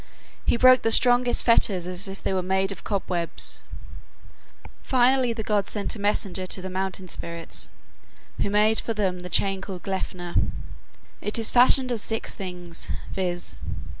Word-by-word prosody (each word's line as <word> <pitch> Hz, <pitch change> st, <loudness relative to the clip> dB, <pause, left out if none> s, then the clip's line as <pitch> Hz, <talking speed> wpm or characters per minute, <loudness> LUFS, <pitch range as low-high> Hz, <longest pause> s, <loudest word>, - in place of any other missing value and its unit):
He -, -, +4 dB
broke 255 Hz, +1 st, +7 dB
the 225 Hz, -, +1 dB
strongest 245 Hz, +1 st, +5 dB
fetters 200 Hz, -6 st, +3 dB
as 180 Hz, +2 st, -3 dB
if 195 Hz, 0 st, -8 dB
they -, -, 0 dB
were 185 Hz, -, +1 dB
made 190 Hz, +1 st, 0 dB
of 195 Hz, -, -7 dB
cobwebs. 180 Hz, -4 st, -1 dB, 1.2 s
Finally 255 Hz, -1 st, +3 dB
the 225 Hz, -1 st, -4 dB
gods 205 Hz, -1 st, 0 dB
sent 205 Hz, +1 st, -3 dB
a -, -, -9 dB
messenger 195 Hz, -2 st, -1 dB
to 185 Hz, -, -2 dB
the 185 Hz, 0 st, -6 dB
mountain 190 Hz, 0 st, -3 dB
spirits, 170 Hz, -1 st, -5 dB, 0.7 s
who -, -, 0 dB
made 210 Hz, +2 st, +3 dB
for 230 Hz, -, -3 dB
them 190 Hz, -4 st, 0 dB
the 180 Hz, 0 st, -8 dB
chain 195 Hz, +1 st, +1 dB
called 190 Hz, -2 st, -7 dB
Gleipnir. 180 Hz, -2 st, -4 dB, 0.9 s
It 210 Hz, -, -1 dB
is 225 Hz, -1 st, 0 dB
fashioned 255 Hz, +1 st, +5 dB
of 235 Hz, -, 0 dB
six 225 Hz, +1 st, -2 dB
things, 180 Hz, -3 st, -5 dB, 0.2 s
viz. 180 Hz, -2 st, -3 dB
195 Hz, 160 wpm, -25 LUFS, 185-225 Hz, 1.2 s, broke